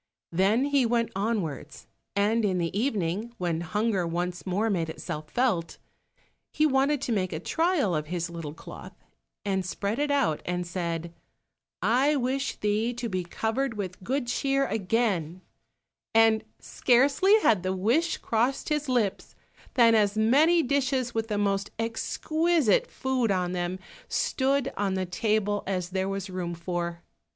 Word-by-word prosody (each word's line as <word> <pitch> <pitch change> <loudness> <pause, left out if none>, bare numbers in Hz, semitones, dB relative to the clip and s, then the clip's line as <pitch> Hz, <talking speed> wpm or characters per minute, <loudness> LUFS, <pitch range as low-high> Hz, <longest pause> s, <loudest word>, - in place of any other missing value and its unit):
Then 200 +9 +3
he 285 -2 +3
went 235 -1 +1
onwards, 195 -7 -3 0.3
and 215 +3 +2
in 190 -3 +1
the 170 0 -2
evening, 215 -1 -1
when 170 -2 -1
hunger 205 0 0
once 175 +2 -3
more 200 +5 +1
made 170 -6 0
itself 155 -1 -6
felt, 215 - 0 0.7
he 305 - +2
wanted 275 0 +2
to 250 - -2
make 185 -5 0
a 155 - -3
trial 320 - +1
of 150 0 -2
his 170 0 -2
little 165 -3 -7
cloth, - - -10 0.5
and 190 -2 0
spread 200 +5 -3
it 295 0 +1
out 275 - +1
and 180 0 -2
said, 170 -1 -3 0.7
"I 260 +8 +3
wish 270 +1 -1
thee 215 +3 0
to 240 -1 -3
be 185 -2 -2
covered 225 +7 -2
with 190 -3 -5
good 265 +5 -1
cheer 275 +3 +1
again," 190 - -1 0.7
and 225 -1 +5
scarcely 280 - +3
had 215 - +4
the 185 +1 -1
wish 240 - +1
crossed 240 +7 0
his 300 -2 -1
lips 225 -6 -1 0.4
than 235 -3 +6
as 210 -1 +3
many 300 +10 +4
dishes 260 -2 0
with 225 0 -1
the 210 -2 -1
most 200 -1 0
exquisite 305 - +1
food 260 -3 -1
on 180 -2 0
them 180 0 -2 0.3
stood 270 0 0
on 200 -2 0
the 190 0 -1
table 205 +2 0
as 180 -2 -2
there 190 +1 -1
was 195 0 -3
room 180 -2 -4
for. 170 0 -4
210 Hz, 150 wpm, -27 LUFS, 180-255 Hz, 0.7 s, than